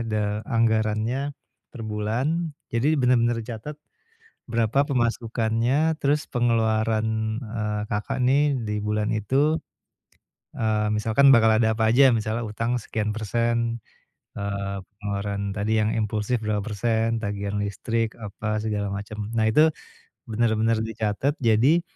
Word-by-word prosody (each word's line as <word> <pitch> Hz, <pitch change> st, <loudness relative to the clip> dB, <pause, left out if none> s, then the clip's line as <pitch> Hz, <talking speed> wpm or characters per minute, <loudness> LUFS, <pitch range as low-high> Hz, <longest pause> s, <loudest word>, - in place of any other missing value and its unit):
de 105 Hz, 0 st, -1 dB
anggarannya 115 Hz, +4 st, 0 dB, 0.3 s
per 120 Hz, -, -11 dB
bulan. 130 Hz, +10 st, -2 dB, 0.2 s
Jadi 140 Hz, +7 st, +2 dB
bener-bener 120 Hz, -2 st, +3 dB
dicatat 120 Hz, +6 st, -7 dB, 0.7 s
berapa 115 Hz, +4 st, +1 dB
pemasukannya, 120 Hz, +4 st, 0 dB
terus 145 Hz, +2 st, +1 dB
pengeluaran, 110 Hz, -2 st, +1 dB, 0.4 s
eee, 105 Hz, -1 st, -3 dB
Kakak 105 Hz, +4 st, -1 dB
nih 140 Hz, +2 st, +3 dB
di 105 Hz, -4 st, -2 dB
bulan 105 Hz, +1 st, -1 dB
itu, 140 Hz, +9 st, +1 dB, 1.0 s
eee, 110 Hz, -1 st, 0 dB
misalkan 115 Hz, +5 st, +5 dB
bakal 110 Hz, -1 st, +5 dB
ada 110 Hz, -1 st, +2 dB
apa 110 Hz, -, 0 dB
aja. 130 Hz, -1 st, +6 dB
Misalnya 110 Hz, +2 st, -2 dB
utang 115 Hz, +3 st, -1 dB
sekian 105 Hz, -1 st, -2 dB
persen, 115 Hz, +1 st, 0 dB, 0.6 s
eee, 100 Hz, -1 st, -3 dB, 0.2 s
pengeluaran 100 Hz, -1 st, -3 dB
tadi 105 Hz, +2 st, -1 dB
yang 105 Hz, +1 st, +1 dB
impulsif 110 Hz, +2 st, 0 dB
berapa 105 Hz, -1 st, 0 dB
persen, 115 Hz, +2 st, 0 dB
tagihan 100 Hz, 0 st, -3 dB
listrik, 115 Hz, +2 st, -2 dB
apa 105 Hz, 0 st, -3 dB
segala 105 Hz, -2 st, -2 dB
macem. 105 Hz, +1 st, -5 dB
Nah 110 Hz, -1 st, +2 dB
itu 155 Hz, +8 st, +5 dB, 0.6 s
bener-bener 115 Hz, 0 st, +2 dB
dicatet, 110 Hz, +5 st, -1 dB
jadi, 125 Hz, +10 st, +4 dB
110 Hz, 120 wpm, -24 LUFS, 105-120 Hz, 1.0 s, aja